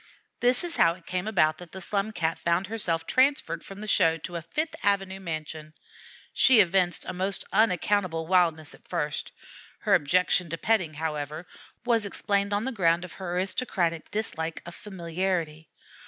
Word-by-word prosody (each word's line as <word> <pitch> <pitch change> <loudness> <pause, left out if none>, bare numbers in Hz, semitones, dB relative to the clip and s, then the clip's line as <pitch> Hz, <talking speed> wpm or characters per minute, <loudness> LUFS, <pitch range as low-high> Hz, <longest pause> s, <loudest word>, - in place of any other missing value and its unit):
This 245 +4 +3
is 345 -1 -4
how 165 0 +4
it 180 - -19
came 185 +2 -3
about 155 -7 +2
that 175 -2 -12
the 190 - -6
Slum 200 +3 -1
Cat 165 -5 -1
found 170 +3 +1
herself 175 -6 -2
transferred 260 - +1
from 195 +1 -10
the 215 - -6
show 165 -5 +3
to 175 +2 -7
a 170 - -3
Fifth 310 - -3
Avenue 195 -1 0
mansion. 155 -3 -6 0.6
She 260 -4 +6
evinced 180 -2 +3
a - - -4
most 190 +2 -1
unaccountable 185 -4 +2
wildness 165 -4 +2
at - - -19
first. - - -3 0.5
Her - - +2
objection 180 +3 +3
to 165 - -3
petting, 180 -7 +1
however, 150 +1 -4 0.4
was 230 -4 +2
explained 200 0 0
on 205 +3 0
the 265 - -1
ground 175 -5 +2
of 180 - -11
her 180 -2 -5
aristocratic 180 -3 -1
dislike 165 -6 -3
of 170 - -8
familiarity. 170 -4 -3
180 Hz, 170 wpm, -27 LUFS, 165-205 Hz, 0.6 s, She